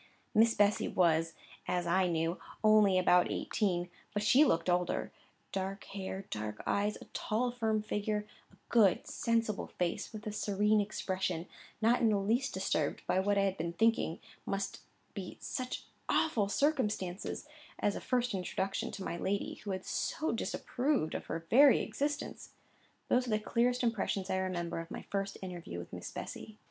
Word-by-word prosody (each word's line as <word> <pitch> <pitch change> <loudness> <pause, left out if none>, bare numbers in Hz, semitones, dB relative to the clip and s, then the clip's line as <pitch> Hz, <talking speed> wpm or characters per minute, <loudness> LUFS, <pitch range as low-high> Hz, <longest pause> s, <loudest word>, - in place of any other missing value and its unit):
Miss 225 0 +5
Bessy 205 0 +3
was, 165 -2 +2 0.3
as 180 -1 0
I 185 +2 +3
knew, 165 0 0 0.2
only 215 -3 +6
about 180 -1 +5
eighteen, 180 -5 0 0.3
but 205 - +1
she 255 +7 +6
looked 165 - +2
older. 180 -1 +1 0.4
Dark 195 +1 -3
hair, 195 0 -5
dark 105 0 -4
eyes, 205 +1 +1
a - - -9
tall, 240 +3 0
firm 220 -3 0
figure, 210 0 -1 0.3
a - - -20
good, 215 0 +4
sensible 230 -7 0
face, 175 -1 -2
with 215 -1 -8
a 215 - -2
serene 210 +1 +2
expression, 185 -4 -2 0.4
not 235 +2 +4
in 230 - +5
the 210 - +3
least 230 +7 +1
disturbed - - -1
by - - +2
what 200 +1 +2
I 200 - +4
had 195 -1 0
been 170 +1 -2
thinking 220 -3 +2 0.2
must 195 0 -3 0.3
be 190 -3 -6
such 255 0 -4 0.2
awful 220 -11 +2
circumstances 210 - 0 0.3
as 205 - +1
a - - -4
first 250 -2 0
introduction 190 +1 -2
to 195 - -5
my 170 - -3
lady, 200 +3 -2
who 210 - -6
had 185 -1 -3
so 315 - -1
disapproved 245 - -1
of - - -4
her 165 +1 -4
very 275 +2 +8
existence: 290 +1 -3 0.5
those 250 0 +2
are - - -3
the 215 - +3
clearest 245 +3 +1
impressions 205 -4 0
I 190 - +1
remember 180 -3 -2
of 165 0 -7
my - - -6
first 195 0 -2
interview 175 - -6
with 85 0 -8
Miss - - -6
Bessy. 215 -1 -7
200 Hz, 165 wpm, -33 LUFS, 180-225 Hz, 0.5 s, very